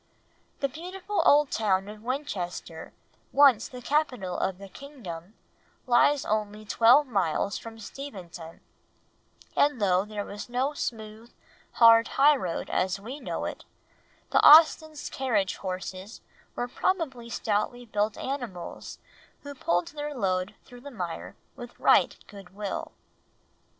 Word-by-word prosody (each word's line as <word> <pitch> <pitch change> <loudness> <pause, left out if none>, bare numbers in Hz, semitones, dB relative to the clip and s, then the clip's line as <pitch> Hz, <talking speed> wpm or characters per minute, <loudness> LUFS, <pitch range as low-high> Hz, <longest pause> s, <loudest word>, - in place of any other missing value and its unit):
The 275 - +2
beautiful 365 +8 -4
old 290 -1 +5
town 195 -3 +1
of 210 0 -10
Winchester, 200 - -5 0.4
once 270 -6 +5
the 250 -1 -10
capital 250 - -1
of 190 -1 -2
the 195 +1 -10
kingdom, 200 - -10 0.5
lies 265 +3 +3
only 215 0 -2
twelve 235 +7 +5
miles 200 - -1
from 225 -1 -10
Steventon, 190 - -9 0.9
and 290 -3 +2
though 190 -2 +2
there 210 -1 -5
was 205 +3 -8
no 260 +4 -1
smooth, 220 -3 -6 0.4
hard 230 0 +6
high 295 +2 +6
road 180 -10 -4
as 185 +1 0
we 250 +8 -8
know - - -4
it, - - -6 0.7
the - - +3
Austens' 310 0 +6
carriage 220 -8 -1
horses 185 +2 -6 0.3
were 245 - -2
probably 265 -6 -2
stoutly 230 +3 -2
built 210 -1 -1
animals 245 -10 -6 0.5
who 285 0 -7
pulled 175 -9 -1
their 295 0 -6
load 190 -2 -1
through 245 0 -14
the 285 - -9
mire 170 - -6 0.2
with 245 -2 -11
right - - +4
goodwill. 200 0 -7
225 Hz, 125 wpm, -27 LUFS, 195-275 Hz, 0.9 s, hard